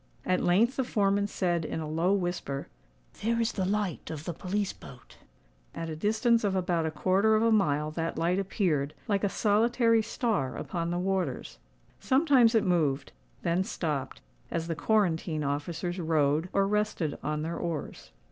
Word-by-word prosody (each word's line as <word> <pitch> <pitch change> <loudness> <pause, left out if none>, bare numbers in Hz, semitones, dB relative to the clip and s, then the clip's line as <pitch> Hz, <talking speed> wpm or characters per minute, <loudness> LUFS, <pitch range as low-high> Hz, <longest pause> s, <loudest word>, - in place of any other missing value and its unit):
At 185 - +1
length 220 +9 +3
the 265 - +2
foreman 200 -3 +1
said 175 -4 0
in 155 - -4
a 155 - -4
low 165 +4 +1
whisper, 175 -8 -2 0.5
"There 230 +2 +1
is 230 0 +1
the 190 - -2
light 205 -3 -2
of 155 -1 -6
the 175 - -3
police 195 +4 -2
boat." 125 -2 -14 0.6
At 165 -1 -4
a - - -4
distance 220 +6 +2
of 200 -2 +1
about 175 -3 0
a - - 0
quarter 190 +7 +2
of 215 - +2
a 230 - +3
mile 150 -7 +2
that 165 +1 -3
light 175 +3 +1
appeared, 170 -8 0
like 200 -2 0
a 200 - +2
solitary 230 +3 +3
star 220 - -1
upon 170 -2 -3
the 175 - -1
waters. 180 -7 -2 0.4
Sometimes 260 -4 +4
it 220 - +4
moved—then 145 - -1
stopped, 150 -7 -3 0.3
as 165 -1 -2
the 165 - -1
quarantine 165 -5 +1
officers 160 +5 -3
rowed, 160 0 +1
or 195 0 +2
rested 210 -7 -1
on 150 0 -2
their 165 +2 -3
oars. 165 -4 -5
180 Hz, 165 wpm, -29 LUFS, 160-210 Hz, 0.6 s, Sometimes